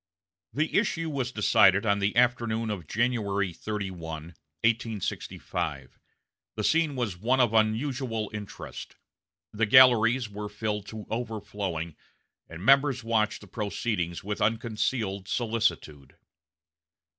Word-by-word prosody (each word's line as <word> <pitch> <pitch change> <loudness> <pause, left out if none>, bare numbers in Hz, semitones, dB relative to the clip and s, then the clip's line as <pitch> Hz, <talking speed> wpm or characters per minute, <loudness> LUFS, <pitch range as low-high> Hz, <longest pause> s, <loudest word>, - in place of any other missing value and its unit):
The 155 +3 -1
issue 165 -7 -1
was 130 -3 -2
decided 100 -2 +4
on 100 -1 +2
the 100 +1 0
afternoon 115 -2 +2
of 90 -7 -5
January 100 -5 0
31, 85 -6 -5 0.3
1865. 105 - -2 0.6
The 110 - -3
scene 160 +2 +2
was 115 -8 -2
one 125 +6 +2
of 120 -3 +3
unusual 115 0 0
interest. 105 -2 -8 0.6
The 110 +1 +1
galleries 120 0 +6
were 105 0 -6
filled 105 -1 -3
to 110 -1 -8
overflowing, 105 -8 -4 0.5
and 85 +4 -8
members 135 -2 +4
watched 110 -2 0
the 105 - -13
proceedings 100 -3 -3
with 105 +1 -4
unconcealed 110 -3 -1
solicitude. 100 - -2
110 Hz, 110 wpm, -27 LUFS, 100-120 Hz, 0.6 s, galleries